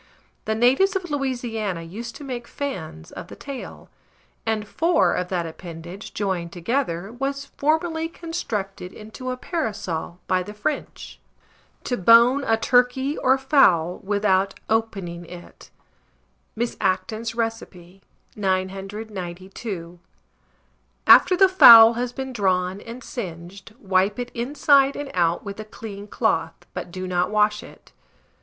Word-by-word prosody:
The 220 Hz, -, 0 dB
natives 265 Hz, -, +3 dB
of 360 Hz, -4 st, -3 dB
Louisiana 235 Hz, -, -2 dB
used 225 Hz, +8 st, -8 dB
to -, -, -9 dB
make 245 Hz, -3 st, -6 dB
fans 160 Hz, -, -6 dB
of 175 Hz, -, -9 dB
the -, -, -11 dB
tail; 280 Hz, -2 st, -9 dB, 0.6 s
and 220 Hz, -1 st, -1 dB
four 335 Hz, +9 st, +2 dB
of 180 Hz, -, -2 dB
that 180 Hz, -2 st, -2 dB
appendage 170 Hz, +3 st, -9 dB
joined 185 Hz, -4 st, -2 dB
together 185 Hz, 0 st, -2 dB
was 275 Hz, +2 st, -3 dB
formerly 320 Hz, +3 st, -1 dB
constructed 210 Hz, -, -5 dB
into 220 Hz, +4 st, -8 dB
a 255 Hz, -, -3 dB
parasol 205 Hz, -, -4 dB
by 185 Hz, 0 st, +1 dB
the 210 Hz, +3 st, -8 dB
French. 210 Hz, +8 st, -4 dB, 0.6 s
TO 245 Hz, -, -2 dB
BONE 235 Hz, +7 st, +6 dB
A 225 Hz, -, +2 dB
TURKEY 250 Hz, +4 st, +2 dB
OR 260 Hz, +1 st, +3 dB
FOWL 190 Hz, -, +3 dB
WITHOUT 195 Hz, -1 st, 0 dB
OPENING 195 Hz, -6 st, -2 dB
IT. 175 Hz, 0 st, -12 dB, 0.9 s
(Miss 235 Hz, +2 st, -2 dB
Acton's 215 Hz, +5 st, -1 dB
Recipe.) 195 Hz, -5 st, -5 dB, 0.3 s
992. 190 Hz, -2 st, -4 dB, 1.1 s
After 365 Hz, -, +7 dB
the 385 Hz, +1 st, +7 dB
fowl 230 Hz, -11 st, +10 dB
has 240 Hz, +1 st, -3 dB
been 265 Hz, 0 st, -6 dB
drawn 190 Hz, -2 st, 0 dB
and 240 Hz, +2 st, -9 dB
singed, 190 Hz, 0 st, -8 dB
wipe 195 Hz, -1 st, +1 dB
it 245 Hz, 0 st, -5 dB
inside 275 Hz, +2 st, +3 dB
and 290 Hz, -1 st, -6 dB
out 170 Hz, 0 st, +1 dB
with 200 Hz, +1 st, -7 dB
a -, -, -4 dB
clean 210 Hz, -1 st, -9 dB
cloth, -, -, 0 dB, 0.2 s
but -, -, -6 dB
do 185 Hz, +1 st, -6 dB
not 180 Hz, -1 st, 0 dB
wash 210 Hz, 0 st, +2 dB
it. -, -, -15 dB
215 Hz, 130 wpm, -23 LUFS, 185-255 Hz, 1.1 s, fowl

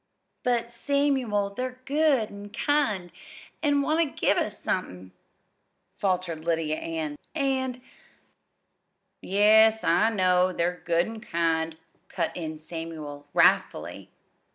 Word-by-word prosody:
"But, 240 Hz, -1 st, 0 dB
Samuel, 250 Hz, -6 st, 0 dB
they're 255 Hz, +2 st, -4 dB
good 280 Hz, -6 st, +2 dB
an' 205 Hz, 0 st, -9 dB
kind, 215 Hz, -, 0 dB, 0.5 s
an' 290 Hz, -2 st, +2 dB
want 315 Hz, +3 st, +2 dB
ter 295 Hz, -, -6 dB
give -, -, +2 dB
us -, -, -1 dB
somethin'," 95 Hz, -, -4 dB, 0.9 s
faltered 180 Hz, -5 st, -1 dB
Lydia 160 Hz, -2 st, 0 dB
Ann; 160 Hz, -3 st, -4 dB, 0.2 s
"and 260 Hz, -3 st, -1 dB, 0.7 s
" -, -, -50 dB
"Yes, 220 Hz, +3 st, +5 dB
I 190 Hz, +7 st, +4 dB
know 185 Hz, -3 st, +2 dB
they're 175 Hz, +1 st, -1 dB
good 170 Hz, 0 st, +2 dB
an' 225 Hz, 0 st, -8 dB
kind," 165 Hz, -4 st, -1 dB, 0.3 s
cut 170 Hz, -3 st, -2 dB
in 160 Hz, -3 st, -5 dB
Samuel 155 Hz, -3 st, -7 dB
wrathfully. -, -, +2 dB
200 Hz, 115 wpm, -26 LUFS, 165-250 Hz, 0.9 s, Yes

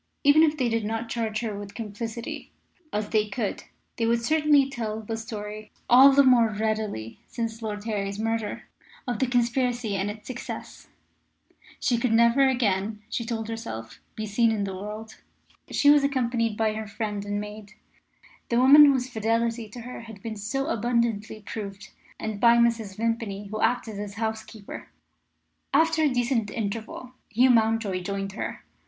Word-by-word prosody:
Even 285 Hz, +2 st, +6 dB
if 310 Hz, -1 st, +3 dB
they 255 Hz, -4 st, +1 dB
did 230 Hz, -1 st, 0 dB
not 225 Hz, +2 st, -3 dB
charge 225 Hz, -1 st, -2 dB
her 220 Hz, -3 st, -3 dB
with 200 Hz, 0 st, -8 dB
complicity, 225 Hz, +1 st, -6 dB, 0.4 s
as 210 Hz, 0 st, -2 dB
they 215 Hz, -1 st, +2 dB
could, 205 Hz, 0 st, -3 dB, 0.3 s
they 230 Hz, -, +1 dB
would 230 Hz, 0 st, +1 dB
certainly 300 Hz, -2 st, +4 dB
tell 225 Hz, -5 st, -4 dB
the 220 Hz, +1 st, -4 dB
story 215 Hz, -1 st, -7 dB, 0.2 s
all 265 Hz, +3 st, +8 dB
the 280 Hz, +1 st, +6 dB
more 245 Hz, -4 st, +5 dB
readily 215 Hz, -, -3 dB
since 230 Hz, -1 st, -4 dB
Lord 210 Hz, -2 st, -4 dB
Harry's 200 Hz, -3 st, -2 dB
murder 225 Hz, 0 st, -2 dB, 0.4 s
of 240 Hz, -4 st, -2 dB
the 260 Hz, -, +2 dB
conspiracy 245 Hz, -2 st, 0 dB
and 195 Hz, +1 st, -1 dB
its 210 Hz, +1 st, -8 dB
success. 255 Hz, -1 st, -7 dB, 0.9 s
She 245 Hz, -4 st, +1 dB
could 235 Hz, -1 st, +1 dB
never 235 Hz, +4 st, +5 dB
again, 210 Hz, -4 st, 0 dB
she 235 Hz, -, -1 dB
told 225 Hz, -1 st, -3 dB
herself, 115 Hz, -, -6 dB, 0.2 s
be 215 Hz, -, -4 dB
seen 225 Hz, +2 st, +2 dB
in 215 Hz, -2 st, -1 dB
the 195 Hz, -1 st, -3 dB
world. 210 Hz, +3 st, -7 dB, 0.5 s
She 285 Hz, -, +5 dB
was 290 Hz, -1 st, +5 dB
accompanied 235 Hz, -5 st, 0 dB
by 220 Hz, -1 st, +1 dB
her 215 Hz, 0 st, -5 dB
friend 210 Hz, -1 st, -4 dB
and 205 Hz, 0 st, -2 dB
maid 210 Hz, 0 st, -8 dB, 0.8 s
the 235 Hz, -, +2 dB
woman 280 Hz, +4 st, +9 dB
whose 260 Hz, -3 st, +3 dB
fidelity 230 Hz, -1 st, -1 dB
to 240 Hz, +3 st, -9 dB
her 250 Hz, +1 st, -8 dB
had 220 Hz, -4 st, -12 dB
been 225 Hz, -1 st, -4 dB
so 230 Hz, +7 st, -2 dB
abundantly 230 Hz, -3 st, -1 dB
proved 200 Hz, -2 st, -7 dB, 0.3 s
and 215 Hz, -2 st, -4 dB
by 235 Hz, +1 st, +6 dB
Mrs. 230 Hz, -4 st, +1 dB
Vimpany, 220 Hz, -3 st, -2 dB
who 215 Hz, -, -4 dB
acted 225 Hz, -4 st, 0 dB
as 205 Hz, -1 st, -6 dB
housekeeper. 220 Hz, -1 st, -5 dB, 0.9 s
After 325 Hz, 0 st, +4 dB
a 305 Hz, -, +4 dB
decent 245 Hz, -3 st, 0 dB
interval, 225 Hz, +3 st, -5 dB, 0.2 s
Hugh 250 Hz, +3 st, +4 dB
Mountjoy 220 Hz, -5 st, +2 dB
joined 195 Hz, +1 st, -3 dB
her. 200 Hz, -, -5 dB
225 Hz, 165 wpm, -26 LUFS, 210-240 Hz, 0.9 s, woman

